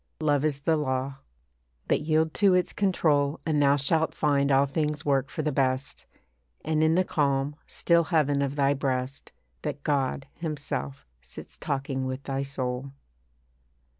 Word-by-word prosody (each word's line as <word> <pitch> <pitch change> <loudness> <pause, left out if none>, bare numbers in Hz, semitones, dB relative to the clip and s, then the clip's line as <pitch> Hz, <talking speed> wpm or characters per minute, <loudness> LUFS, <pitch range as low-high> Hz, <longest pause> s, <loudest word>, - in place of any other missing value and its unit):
Love 145 -2 +2
is 145 -2 0
the 160 +3 +2
law. 135 -2 -2 0.7
But - - +2
yield 155 +1 +1
to 195 -3 +4
its 180 -1 +1
control 155 -7 +1
And 155 -3 +1
thou 140 0 +5
shalt 155 +3 0
find 140 -2 +2
all 135 +1 +5
things 150 +1 -2
work 135 -1 +1
for 155 - -4
the 150 - 0
best, 130 0 -1 0.6
And 155 0 +1
in 160 +1 +3
the 185 - +4
calm, 140 -3 0
still 170 -1 +2
heaven 145 -4 +2
of 140 0 -1
thy 140 -1 +3
breast, 135 -1 -3 0.3
That 145 -2 -5
God, 135 -2 0
Himself, 145 -3 -4 0.2
sits 65 -1 -10
talking 135 -1 -3
with 130 +1 -5
thy 135 0 -2
soul. 135 -1 -4
145 Hz, 155 wpm, -27 LUFS, 135-155 Hz, 0.7 s, thou